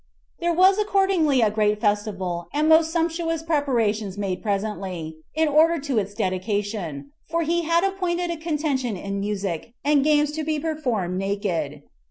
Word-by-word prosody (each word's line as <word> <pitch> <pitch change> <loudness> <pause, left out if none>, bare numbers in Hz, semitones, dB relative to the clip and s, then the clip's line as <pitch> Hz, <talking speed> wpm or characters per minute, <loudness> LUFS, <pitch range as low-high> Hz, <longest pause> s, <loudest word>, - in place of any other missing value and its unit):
There 345 0 +1
was 375 +4 +5
accordingly 385 - +2
a 215 -2 +3
great 210 -1 +1
festival 200 -5 -1
and 300 +2 +1
most 320 0 +5
sumptuous 330 -1 -1
preparations 230 - 0
made 195 -3 -2
presently, 195 -6 -3 0.2
in 320 0 +3
order 315 +3 +4
to 275 -5 0
its 200 0 -4
dedication; 185 -7 -2 0.2
for 335 +1 0
he 340 +1 0
had 335 +2 +3
appointed 360 -3 -1
a 335 - -3
contention 295 - -1
in 200 +2 -4
music, 200 -1 -3
and 290 -1 +4
games 295 0 +3
to 310 +1 -3
be 310 0 -1
performed 250 - -2
naked. 175 -8 -2
255 Hz, 155 wpm, -24 LUFS, 200-320 Hz, 0.2 s, was